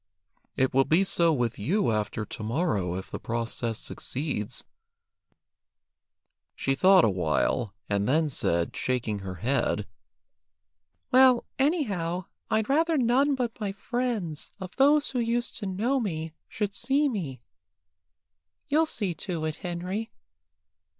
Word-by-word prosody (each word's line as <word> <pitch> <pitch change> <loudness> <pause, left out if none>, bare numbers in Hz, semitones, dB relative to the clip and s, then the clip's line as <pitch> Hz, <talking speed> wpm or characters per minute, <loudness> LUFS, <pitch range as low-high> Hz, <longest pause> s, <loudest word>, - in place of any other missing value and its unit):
It 130 0 +2
will 135 +1 +5
be 165 +7 +3
so 170 -3 +3
with 120 -7 -1
you 185 - +1
after 105 0 -1
to - - -8
morrow 110 - 0
if 95 - -6
the - - -4
process 115 -1 -2
succeeds." 125 -4 -4 1.9
She 135 - 0
thought 185 +5 +6
a - - +4
while, 95 - 0
and 100 +2 0
then 155 +3 +3
said, 85 - -1
shaking 120 -5 -1
her 95 -1 -6
head 115 0 0 1.3
"Well, 255 -1 +6
anyhow, 200 - 0 0.2
I'd 220 -1 +1
rather 320 +3 +2
none 265 +3 +3
but 240 -4 -3
my 205 -3 -2
friends, 215 -7 -3
of 185 -2 -8
those 290 +2 +4
who 255 - -1
used 235 +1 -1
to 205 - -4
know 225 +9 0
me, 160 -8 -3 0.2
should 205 -2 -2
see 275 +7 +2
me. 170 - -3 1.3
You'll 315 +3 +3
see 200 - -1
to 165 -1 -4
it, 155 -1 -3
Henry. 185 +4 -4
175 Hz, 130 wpm, -27 LUFS, -, 1.9 s, thought